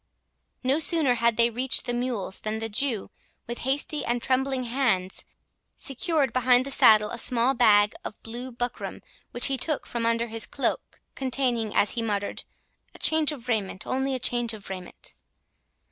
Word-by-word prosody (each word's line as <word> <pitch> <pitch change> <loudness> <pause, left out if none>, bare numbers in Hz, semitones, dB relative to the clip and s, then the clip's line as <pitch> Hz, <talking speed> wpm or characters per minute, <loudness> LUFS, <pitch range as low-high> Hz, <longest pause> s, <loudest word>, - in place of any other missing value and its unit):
No 265 +4 +2
sooner 320 -5 +4
had 235 -1 +1
they 235 0 +3
reached 255 +3 +2
the 245 - -2
mules, 240 -6 -2
than 215 0 -3
the 225 0 -3
Jew, 225 -1 -2 0.3
with 240 +1 -6
hasty 280 +3 -1
and 240 +1 -1
trembling 260 +1 0
hands, 235 -7 -1 0.5
secured 285 +1 0
behind 255 0 +4
the 275 - -3
saddle 215 -5 +5
a 235 - -3
small 245 +2 +3
bag 210 -4 +4
of - - -7
blue 240 +3 -7
buckram, 245 0 -5 0.3
which 240 - -1
he 270 -1 0
took 305 -3 0
from 235 -1 -2
under 230 0 +1
his 225 -1 -3
cloak, 275 - -2
containing, 250 -5 0
as 205 - +4
he 235 - -1
muttered, 205 -3 -3 0.5
"a - - -9
change 315 -1 +3
of 255 -5 -9
raiment—only 245 +5 -1
a - - -3
change 240 -2 0
of 205 -2 -9
raiment." 185 -2 -8
240 Hz, 165 wpm, -26 LUFS, 225-265 Hz, 0.5 s, saddle